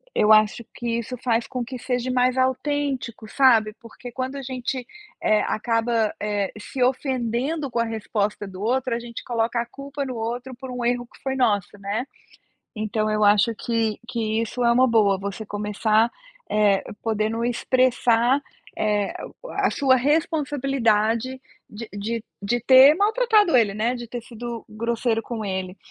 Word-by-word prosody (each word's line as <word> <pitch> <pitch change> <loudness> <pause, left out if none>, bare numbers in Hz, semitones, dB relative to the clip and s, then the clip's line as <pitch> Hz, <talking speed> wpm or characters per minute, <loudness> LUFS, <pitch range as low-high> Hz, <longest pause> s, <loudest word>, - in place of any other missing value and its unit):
eu 215 +1 +5
acho 215 +2 +3
que 235 -1 -2
isso 250 +2 -5
faz 230 -2 +1
com 250 -2 -3
que 255 +2 -7
seja 250 0 -2
mais 250 0 +2
autêntico, 260 -3 -1
sabe, 225 -6 +4
porque 240 +1 -11
quando 260 +2 -4
a - - -5
gente, 255 0 -4 0.4
eh, 215 0 +3
acaba, 230 -1 +1
eh, 205 -2 -1
se 255 +4 -6
ofendendo 260 +3 -1
com 240 - -4
a - - +3
resposta 210 -2 -2
do 190 -1 -10
outro, 250 +2 0
a - - -2
gente 235 -1 -8
coloca 235 0 -1
a 235 - -4
culpa 280 +3 -6
no 255 -2 -5
outro 240 +3 -4
por 260 +1 -8
um 250 -1 -4
erro 245 0 0
que - - -19
foi 265 -1 -2
nosso, 205 -6 +1
né. 200 +4 -2 0.7
Então 215 0 -1
eu 215 0 +2
acho 205 +3 +4
que 225 -2 -1
que 225 -2 -1
isso 240 +2 -3
é 235 - +5
uma 255 +2 +4
boa, 210 -4 +3
você 200 +2 -5
começar, 210 +2 +1 0.4
eh, 205 -2 +3 0.2
podendo 220 +1 -1
expressar, 245 +1 +2 0.4
eh, 210 -2 0 0.5
a - - +3
sua 265 -2 +3
responsabilidade 260 -5 +1 0.3
de 215 +1 -8
de 220 +3 -4 0.2
de 240 +4 0
ter 260 +4 +8
maltratado 425 - +3
ele, 210 -4 +3
né, 230 +4 0
de 240 -1 -7
ter 240 +1 -6
sido 235 0 -7
grosseiro 230 +1 -1
com 225 -2 -5
ele, 190 -1 -4
235 Hz, 160 wpm, -23 LUFS, 215-255 Hz, 0.7 s, ter